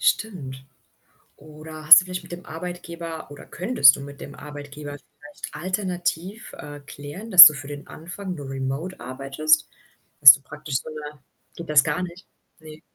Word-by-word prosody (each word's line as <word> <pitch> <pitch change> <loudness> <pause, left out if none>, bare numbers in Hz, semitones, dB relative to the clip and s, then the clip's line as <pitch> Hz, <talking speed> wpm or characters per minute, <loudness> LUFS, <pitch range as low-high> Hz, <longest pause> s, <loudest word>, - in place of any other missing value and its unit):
Stimmt. 180 - -3 0.7
Oder 155 +1 -13
hast 155 - +10
du - - -9
vielleicht 180 0 -7
mit 175 - -15
dem 175 +1 -10
Arbeitgeber 170 -1 -9
oder 145 - -13
könntest 180 - +3
du - - -9
mit 140 0 -12
dem 140 - -11
Arbeitgeber 145 0 -10
vielleicht 145 +1 -13
alternativ, 185 +1 -5
äh, 145 0 -11
klären, 145 +9 -11
dass 180 -4 +12
du 155 - +5
für 140 +1 -10
den 145 0 -10
Anfang 180 +3 -9
nur 145 -4 -9
remote 135 +7 -6
arbeitest? 140 +4 -1 0.5
Dass 135 -2 +11
du 140 - -6
praktisch 150 0 -7
so - - -12
'ne 150 -1 -10 0.4
geht 170 - -10
das 150 -2 +4
gar 180 - -3
nicht? 175 0 -10 0.3
Ne? 155 -1 -14
155 Hz, 165 wpm, -22 LUFS, 145-175 Hz, 0.7 s, dass